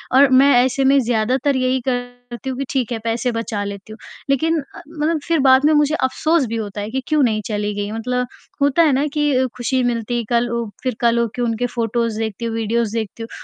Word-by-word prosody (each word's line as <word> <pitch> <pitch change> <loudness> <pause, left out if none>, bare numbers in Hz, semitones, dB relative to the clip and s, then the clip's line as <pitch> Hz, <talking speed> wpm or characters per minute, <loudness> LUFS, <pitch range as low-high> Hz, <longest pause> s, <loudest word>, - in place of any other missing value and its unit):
और 275 0 +7
मैं 270 +2 +6
ऐसे 260 +1 0
में 275 +1 +5
ज़्यादातर 250 +4 +1
यही 255 0 +1
करती 245 0 -5
हूँ 260 - -4
कि 275 - -2
ठीक 255 -4 -1
है, 230 - -2
पैसे 230 +2 -1
बचा 225 -2 -3
लेती 200 +1 -7
हूँ। - - -12 0.3
लेक़िन 320 +4 +2 0.2
अ, - - -9
मतलब 320 0 -1
फ़िर 330 -2 +2
बाद 265 +1 +5
में 310 - +5
मुझे 295 +1 +3
अफ़सोस 310 +3 +1
भी 230 - -4
होता 205 -2 -4
है 210 - -5
कि 265 +3 -2
क्यों 305 -1 +2
नहीं 215 -3 +1
चली 210 -1 -2
गई? 205 0 -3
मतलब 250 +3 -2 0.3
होता 285 +4 +4
है 310 - +4
ना 275 +3 +1
कि 290 -4 +2
खुशी 255 +1 0
मिलती 240 0 -1
कल 240 0 +1
उ, 235 0 -2 0.2
फ़िर 255 -3 -1
कल 235 0 +3
हो 235 - +1
के 245 - -3
उनके 235 0 0
फोटोज़ 230 -1 -1
देखती 225 +1 -3
हूँ, 225 - -3
वीडिओज़ 225 0 -1
देखती 225 +1 -4
हूँ, 225 - -8
245 Hz, 230 wpm, -19 LUFS, 225-270 Hz, 0.3 s, और